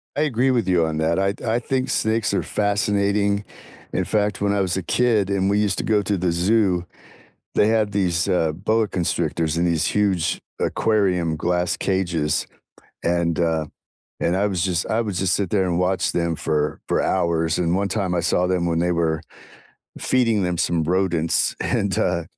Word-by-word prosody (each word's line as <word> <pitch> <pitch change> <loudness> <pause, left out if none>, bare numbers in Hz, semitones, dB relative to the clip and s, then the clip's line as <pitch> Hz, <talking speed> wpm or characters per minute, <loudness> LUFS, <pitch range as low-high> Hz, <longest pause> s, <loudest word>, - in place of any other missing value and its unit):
I 145 - 0
agree 130 -3 +2
with 120 -6 0
you 90 -3 +3
on 80 -1 -3
that, 80 +3 +1
I 95 +1 +1
t - - -14
I 115 +2 +1
think 130 +1 -2
snakes 110 -2 0
are - - 0
fascinating. 100 0 0 0.5
In - - 0
fact, 105 -2 -1
when 100 0 +1
I 100 - +1
was 95 -1 -1
a 95 - -3
kid 110 -2 +1
and 100 0 +1
we 105 +1 +2
used 105 -3 +1
to - - -2
go 105 -2 +2
to 100 +1 0
the 90 -1 0
zoo, 90 0 +1 0.7
they 105 - +4
had 110 -2 +1
these, 90 -4 0
uh, 85 -4 +2
boa 110 +6 0
constrictors 85 -3 -1
in 85 - +1
these 85 -2 +1
huge 100 -5 0 0.2
aquarium, 90 -7 +1
glass 90 +2 0
cages, 85 -6 0 0.6
and, 85 -2 0
uh 80 -2 +1 0.6
and 90 +2 +1
I 100 +2 +2
would 95 -2 -2
just 90 -1 0
I 110 - +1
would 105 -5 -3
just 95 -1 +1
sit 100 -4 -1
there 100 -3 +2
and 90 -1 0
watch 95 +1 0
them 85 -2 -1
for 75 -1 -1
for - - +1
hours, 85 -1 0
and 85 0 +1
one 100 +1 0
time 95 -3 -1
I 85 - +1
saw 90 +1 +1
them 90 -1 0
when 85 -1 0
they 90 +1 +1
were 80 -2 0 0.8
feeding 115 -6 +1
them 90 -1 -1
some 85 -2 +1
rodents, 85 -2 +1
and, 100 -3 0
uh 85 -2 0
95 Hz, 195 wpm, -22 LUFS, 85-105 Hz, 0.8 s, they